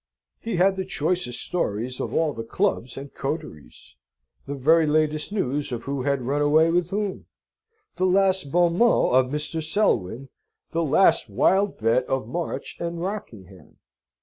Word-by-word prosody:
He 225 Hz, -3 st, -4 dB
had 190 Hz, +2 st, +3 dB
the 190 Hz, -, -1 dB
choicest 175 Hz, -7 st, -2 dB
stories 125 Hz, -, -2 dB
of -, -, -3 dB
all 160 Hz, -2 st, +1 dB
the 115 Hz, -, -6 dB
clubs 115 Hz, +1 st, -1 dB
and 140 Hz, +1 st, -8 dB
coteries 75 Hz, -, -7 dB, 0.5 s
the 140 Hz, -, -4 dB
very 155 Hz, +4 st, +3 dB
latest 155 Hz, +2 st, +1 dB
news 145 Hz, -8 st, -2 dB
of 120 Hz, -1 st, -4 dB
who 140 Hz, -1 st, -3 dB
had 140 Hz, -1 st, 0 dB
run 140 Hz, +4 st, -1 dB
away 155 Hz, +3 st, +4 dB
with 175 Hz, 0 st, +1 dB
whom 205 Hz, 0 st, -3 dB, 0.7 s
the 185 Hz, -, +2 dB
last 190 Hz, -5 st, +2 dB
bon 175 Hz, +1 st, +2 dB
mot 235 Hz, -1 st, +4 dB
of 130 Hz, 0 st, +3 dB
Mr. 150 Hz, +2 st, -2 dB
Selwyn 135 Hz, -, 0 dB, 0.4 s
the 165 Hz, -, 0 dB
last 160 Hz, +5 st, +3 dB
wild 195 Hz, +1 st, +2 dB
bet 115 Hz, +3 st, +2 dB
of 130 Hz, -4 st, -2 dB
March 170 Hz, +7 st, -5 dB
and 170 Hz, 0 st, -4 dB
Rockingham. 110 Hz, -, -7 dB
150 Hz, 155 wpm, -24 LUFS, 130-180 Hz, 0.7 s, away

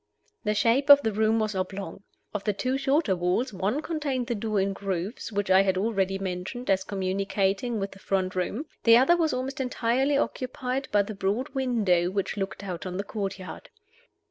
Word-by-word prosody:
The 210 Hz, -2 st, 0 dB
shape 240 Hz, +7 st, +2 dB
of 285 Hz, 0 st, +9 dB
the 220 Hz, -, +1 dB
room 220 Hz, +2 st, +2 dB
was 215 Hz, -1 st, 0 dB
oblong. 195 Hz, +1 st, -4 dB, 0.3 s
Of 210 Hz, -2 st, -3 dB
the 210 Hz, -, 0 dB
two 255 Hz, +6 st, -1 dB
shorter 270 Hz, -, +2 dB
walls, 180 Hz, +8 st, 0 dB
one 205 Hz, -, -1 dB
contained 285 Hz, -6 st, -2 dB
the 240 Hz, -, -2 dB
door 215 Hz, -1 st, -1 dB
in 195 Hz, +1 st, 0 dB
grooves 195 Hz, +3 st, -4 dB
which 205 Hz, -2 st, -1 dB
I 190 Hz, +1 st, +7 dB
have 190 Hz, -1 st, +1 dB
already 195 Hz, -2 st, 0 dB
mentioned 190 Hz, +5 st, -3 dB
as 190 Hz, 0 st, +2 dB
communicating 195 Hz, +3 st, -1 dB
with 195 Hz, 0 st, -3 dB
the 195 Hz, -, -13 dB
front 190 Hz, -1 st, -1 dB
room; 195 Hz, -, -2 dB, 0.2 s
the 230 Hz, 0 st, +8 dB
other 265 Hz, +8 st, +5 dB
was 325 Hz, -2 st, +1 dB
almost 265 Hz, +2 st, -3 dB
entirely 260 Hz, +2 st, +1 dB
occupied 260 Hz, -1 st, -2 dB
by 205 Hz, -1 st, +4 dB
the 215 Hz, -, -6 dB
broad 205 Hz, +8 st, -1 dB
window 220 Hz, -10 st, +1 dB
which 195 Hz, 0 st, -2 dB
looked 195 Hz, 0 st, -4 dB
out 185 Hz, -2 st, -5 dB
on 180 Hz, 0 st, -4 dB
the 200 Hz, -, -2 dB
courtyard. 195 Hz, -3 st, -6 dB
205 Hz, 190 wpm, -27 LUFS, 195-255 Hz, 0.3 s, of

